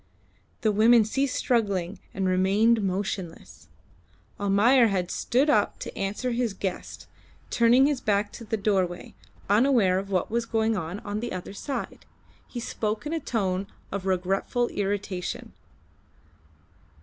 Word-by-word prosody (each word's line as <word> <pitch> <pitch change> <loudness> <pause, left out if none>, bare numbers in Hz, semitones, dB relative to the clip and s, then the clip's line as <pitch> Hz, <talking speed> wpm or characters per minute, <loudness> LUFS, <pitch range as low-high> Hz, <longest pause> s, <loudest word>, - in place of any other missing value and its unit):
The 215 - +2
women 220 +2 +5
ceased 270 +4 -1
struggling 200 -6 0
and 190 -1 -2
remained 200 +5 +3
motionless. 190 -3 -4 0.7
Almayer 220 +5 +4
had 185 -4 -1
stood 260 +5 +1
up 210 -8 +2
to - - -7
answer 210 +6 -2
his 235 -4 -1
guest, 190 -2 -5 0.5
turning 240 +3 +5
his 285 -3 0
back 205 0 +1
to - - -9
the 220 0 -2
doorway, 190 -4 -1 0.3
unaware 210 -4 +4
of 195 +1 -7
what 185 +1 -1
was 230 0 -1
going 225 0 +1
on 180 +1 -4
on 205 0 -4
the 240 +2 -4
other 185 +1 -6
side. 270 +6 -5 0.4
He 245 - -6
spoke 215 0 -3
in 300 - -3
a 330 - 0
tone 195 -8 -1 0.2
of 195 -1 -4
regretful 195 +6 0
irritation. 200 -2 -3
205 Hz, 135 wpm, -26 LUFS, 190-235 Hz, 0.7 s, women